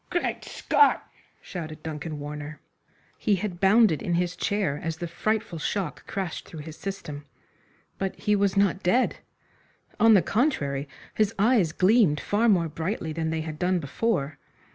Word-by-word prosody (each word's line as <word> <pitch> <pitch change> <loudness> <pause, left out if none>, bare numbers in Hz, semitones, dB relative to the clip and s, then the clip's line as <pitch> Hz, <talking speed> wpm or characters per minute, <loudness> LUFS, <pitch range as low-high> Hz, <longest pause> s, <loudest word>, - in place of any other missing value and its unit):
"Great 350 - -1
Scott!" 440 - +2 0.4
shouted 155 -4 -7
Duncan 155 0 -5
Warner. 150 +1 -7 0.6
He 210 - +2
had 185 -2 -4
bounded 195 - +5
in 175 - 0
his 180 0 0
chair 200 -9 -1
as 165 0 -3
the 175 - -4
frightful 215 0 -2
shock 185 +1 -3
crashed 190 -4 -4
through 160 - -8
his 155 +1 -9
system. 150 -8 -6 0.7
But 195 -1 -2
he 210 -1 +1
was 200 -1 +1
not 195 -1 +3
dead. 235 +8 +2 0.8
On 225 -1 +7
the 190 - +5
contrary, 145 - 0 0.2
his 215 0 +1
eyes 210 -5 +3
gleamed 185 -5 +4
far 225 +3 +1
more 175 -5 +3
brightly 160 +1 -3
than 160 0 -2
they 160 0 -1
had 155 -1 -6
done 180 +1 +2
before. 155 -2 -1
180 Hz, 155 wpm, -26 LUFS, 155-205 Hz, 0.8 s, On